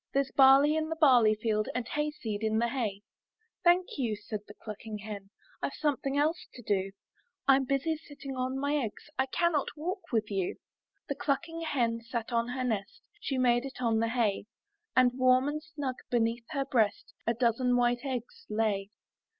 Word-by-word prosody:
There's 275 -1 +2
barley 275 +3 +6
in 315 0 -1
the 325 - -2
barley 250 -9 +6
field. 215 -1 0
And 250 -2 -2
hayseed 295 -9 -3
in 220 0 +1
the 235 +1 +2
hay/* 215 -6 -2 0.6
'Thank 350 -2 +3
you,'* 230 -5 0
said 210 +1 -5
the 205 - -12
clucking 215 0 -7
hen; 205 -2 -7 0.3
"Tve - - -1
something 280 -2 -1
else 310 +3 +1
to 245 - -10
do; 195 -2 0 0.6
Fm 270 -1 +5
busy 285 +4 0
sitting 285 -3 -9
on 255 +1 -2
my 285 +2 +1
eggs, 260 +3 -5
I 265 - +3
cannot 315 0 +1
walk 365 +6 -4
with 220 -3 0
you.'* 190 -3 -1 0.5
The 285 - -1
clucking 330 +4 -2
hen 235 -7 0
sat 235 0 -4
on 230 0 +2
her 255 +1 -3
nest. 220 -5 -3 0.2
She 270 - -2
made 240 -1 +3
it 270 -1 -8
on 230 -3 +2
the 230 0 +1
hay; 225 -5 0 0.5
And 255 -1 +6
warm 255 +1 +5
and 300 +1 -2
snug 290 -4 -5
beneath 230 0 +1
her 275 -2 -1
breast, 225 -6 0
A 230 - +2
dozen 245 +1 +2
white 240 0 +2
eggs 255 -4 -5
lay. 210 -2 0
250 Hz, 180 wpm, -30 LUFS, 225-280 Hz, 0.6 s, barley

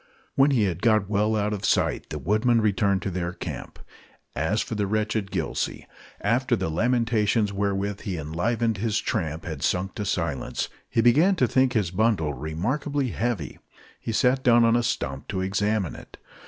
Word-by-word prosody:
When 135 +2 +4
he 130 -6 +3
had 90 -3 -1
got 110 -3 +2
well 105 +2 +2
out 105 0 0
of 100 - -5
sight - - +1
the - - -4
woodmen 110 +5 +2
returned 100 -2 +1
to 95 - -2
their 85 -1 -3
camp. - - -7 0.6
As 95 +8 0
for - - -6
the 105 -2 -1
wretched 110 0 -1
Gillsey, - - -3 0.4
after 125 +1 +2
the 80 - -2
lamentations 115 0 +1
wherewith 100 0 -1
he 95 -4 -4
enlivened 105 +9 -1
his 110 +1 0
tramp 80 -7 -2
had 80 -4 -5
sunk 90 +6 0
to 105 - -4
silence, - - -2 0.2
he 115 - +2
began 150 - +5
to 130 -8 +2
think 130 +1 +2
his 105 -8 0
bundle 95 -7 +1
remarkably 125 - -2
heavy. 110 - -3 0.4
He - - -4
sat 125 +3 +2
down 120 -1 +5
on 115 0 +4
a 120 - +3
stump 70 - -3
to 95 -2 -2
examine 100 0 0
it. - - -13
105 Hz, 175 wpm, -25 LUFS, 95-115 Hz, 0.6 s, began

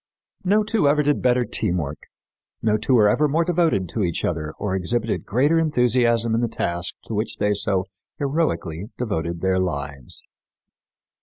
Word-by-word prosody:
No 205 +3 +3
two 210 -7 +1
ever 150 +1 +3
did 145 0 +1
better 125 -1 +3
"teamwork"; 80 -9 -2 0.6
no 110 -1 +3
two 110 +4 +2
were 105 -3 +6
ever 150 +8 +3
more 160 +4 +1
devoted 165 - +1
to 110 - -3
each 85 -2 -1
other 80 -3 -2
or 100 -2 -2
exhibited 110 +5 -1
greater 145 +9 +3
enthusiasm 120 -6 +2
in 115 - +2
the 120 - +1
task 90 -5 -2
to - - -6
which 105 +2 -2
they 105 0 +2
so 95 -2 0 0.3
heroically 120 - -1
devoted 85 -8 -2
their 95 0 +2
lives. 70 -7 -3
110 Hz, 160 wpm, -23 LUFS, 90-140 Hz, 0.6 s, were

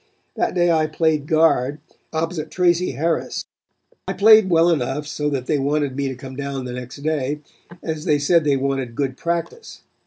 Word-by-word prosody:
That - - -1
day 175 -1 +3
I 160 -1 +2
played 155 -2 0
guard 155 -4 +3 0.3
opposite 160 0 -3
Tracy 175 -2 +1
Harris. 160 +5 -2 0.6
I - - -1
played 215 -1 +6
well 170 0 +4
enough 145 -1 -1
so 150 0 -2
that 135 -3 -3
they 150 0 0
wanted 140 -1 0
me 140 0 -1
to 130 - -4
come 130 +1 -9
down 140 -1 -4
the 125 - -5
next 125 0 -7
day, 150 -1 -1 0.4
as 160 -2 -4
they 150 -4 +3
said 160 +3 +3
they 145 -2 +2
wanted 135 -3 -2
good 135 -2 -1
practice. 170 - -4
150 Hz, 180 wpm, -21 LUFS, 135-165 Hz, 0.6 s, played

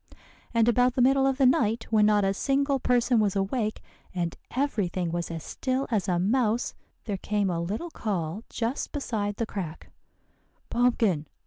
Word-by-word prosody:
"And 230 -1 +3
about 250 +1 +3
the 255 - +2
middle 270 +1 +4
of 270 -1 +1
the 275 - +4
night, 230 -3 +2
when 210 -1 +5
not 210 -2 +3
a 195 - +2
single 275 +5 +1
person 245 -1 +2
was 205 -2 +1
awake, 210 +3 -1 0.3
and 170 -2 -2
every 255 -7 0
thing 175 -1 -2
was 170 0 -2
as 165 -2 -5
still 260 +1 -2
as 210 -3 0
a 180 -2 +1
mouse, 225 +4 +1 0.3
there 205 -4 -2
came 205 0 0
a 170 -1 -1
little 215 - -4
call 195 - -3
just 240 +4 -3
beside 215 -8 -2
the 230 - -1
crack, 180 -7 -6 0.8
'Pumpkin! 225 -10 +2
220 Hz, 175 wpm, -27 LUFS, 195-250 Hz, 0.8 s, when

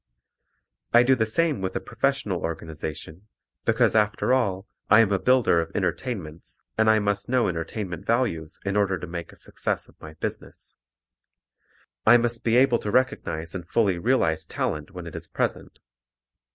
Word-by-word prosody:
I 120 +1 +7
do 130 +2 +4
the 110 -3 0
same 155 - +1
with 95 - -3
a - - 0
professional 120 -5 -1
organization, 80 +2 -6 0.4
because - - +3
after 105 +3 +2
all 100 -6 0 0.2
I 105 +1 +8
am 105 -3 +2
a 100 - +2
builder 115 -5 +3
of 80 - -5
entertainments 85 - -4 0.2
and 110 0 +3
I 110 - +5
must 100 0 -1
know 125 -1 +2
entertainment 90 +2 -4
values 115 -10 -1
in 100 0 -1
order 100 -2 +2
to 85 - -7
make 85 0 -6
a - - -16
success - - -4
of - - -23
my 80 0 -10
business. - - -7 1.3
I 120 - +7
must 120 -1 -1
be 115 0 +2
able 125 -2 +4
to 105 - -4
recognize 85 -10 0
and 90 -2 -7
fully 100 -6 +2
realize 80 -9 +1
talent 75 -1 -3
when 90 -3 -9
it 85 - -8
is - - -6
present. - - -3
100 Hz, 165 wpm, -25 LUFS, 85-120 Hz, 1.3 s, I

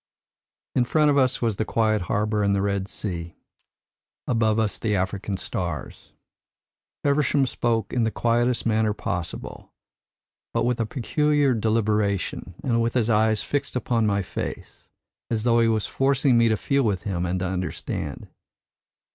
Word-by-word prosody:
"In 125 - +3
front 150 +4 +3
of 140 - +2
us 130 -2 +1
was 110 -4 0
the - - +1
quiet 110 -1 +1
harbour 105 +1 +1
and 100 -1 +2
the 100 - 0
Red 100 -1 -1
Sea, 85 -5 -5 0.9
above 110 -3 +2
us 110 -2 0
the 105 -2 0
African 95 +1 -2
stars. 85 -7 -5 0.9
Feversham 140 -1 +2
spoke 115 -4 -1
in 120 - +2
the 110 - +2
quietest 120 +2 +1
manner 110 -2 +2
possible, 85 -4 -5 0.8
but - - +2
with 120 0 0
a 115 - 0
peculiar 145 +3 +1
deliberation 105 -5 0
and 115 -3 +1
with 115 +1 -1
his 120 -2 +2
eyes 110 0 +2
fixed 145 -2 -2
upon 115 -2 +1
my 100 -1 +1
face, - - -7 0.4
as 110 -2 -1
though 120 -1 +4
he 115 - +4
was 110 -2 +1
forcing 135 -1 +2
me 115 -1 +5
to 110 - +2
feel 140 +5 +1
with 100 -8 0
him 90 -4 -2
and 90 +2 -1
to - - 0
understand. 90 0 -4
110 Hz, 155 wpm, -24 LUFS, 100-120 Hz, 0.9 s, me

